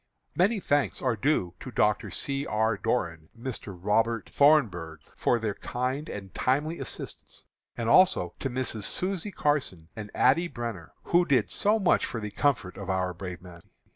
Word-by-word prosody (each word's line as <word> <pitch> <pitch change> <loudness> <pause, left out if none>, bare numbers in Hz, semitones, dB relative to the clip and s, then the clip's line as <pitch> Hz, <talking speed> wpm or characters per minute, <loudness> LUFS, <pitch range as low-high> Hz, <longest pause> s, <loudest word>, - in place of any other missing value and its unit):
"Many 200 +5 +3
thanks 145 -5 +1
are 125 -3 +2
due 110 - +1
to - - -7
Dr. - - +1
C. 140 +1 -3
R. 110 +1 +1
Doran 85 -8 -2
and 115 +3 -14
Mr. 105 -7 -5
Robert 115 +4 +1
Thornburgh, 100 - +3 0.2
for 120 - +2
their 110 -3 -2
kind 130 +8 -3
and 95 -3 -7
timely 150 +6 0
assistance, - - -7 0.3
and 115 -2 -2
also 120 - +5
to 135 - -2
Misses 120 -5 -2
Susie 190 +1 -1
Carson 130 - -1
and 105 -2 -7
Addie 165 +7 +4
Brenner, 115 - -6
who 175 +1 +3
did 130 -9 +2
so 210 +2 +3
much 190 -5 +3
for 115 - -4
the 105 -1 -5
comfort 115 -11 0
of 100 -1 -7
our 95 -1 0
brave 90 0 -7
men. 85 -2 -12
115 Hz, 170 wpm, -28 LUFS, 95-145 Hz, 0.3 s, also